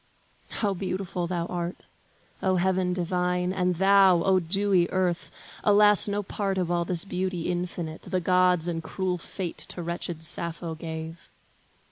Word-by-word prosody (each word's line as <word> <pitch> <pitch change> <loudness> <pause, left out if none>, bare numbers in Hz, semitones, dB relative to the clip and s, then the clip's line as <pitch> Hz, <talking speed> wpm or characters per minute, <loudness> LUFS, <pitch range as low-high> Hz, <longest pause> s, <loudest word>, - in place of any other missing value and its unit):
How 205 -3 -1
beautiful 185 -1 -3
thou 170 -1 -2
art, 175 0 -4 0.6
O 190 0 +2
heaven 185 0 +1
divine, 180 0 0
And 180 -1 +1
thou, 190 -1 +5
O 190 -1 +4
dewy 185 0 +2
earth! 180 -2 0 0.3
Alas 210 0 +5
no 205 0 -1
part 195 0 -2
Of 180 -2 0
all 170 -1 +1
this 175 +1 -2
beauty 185 -2 -2
infinite, 175 -2 -3
the 185 0 -2
gods 180 -1 +3
And 165 -2 -2
cruel 180 +1 -2
fate 175 0 -5
to 175 - -5
wretched 170 -1 -4
Sappho 170 0 -3
gave! 160 0 -7
180 Hz, 145 wpm, -27 LUFS, 170-190 Hz, 0.6 s, thou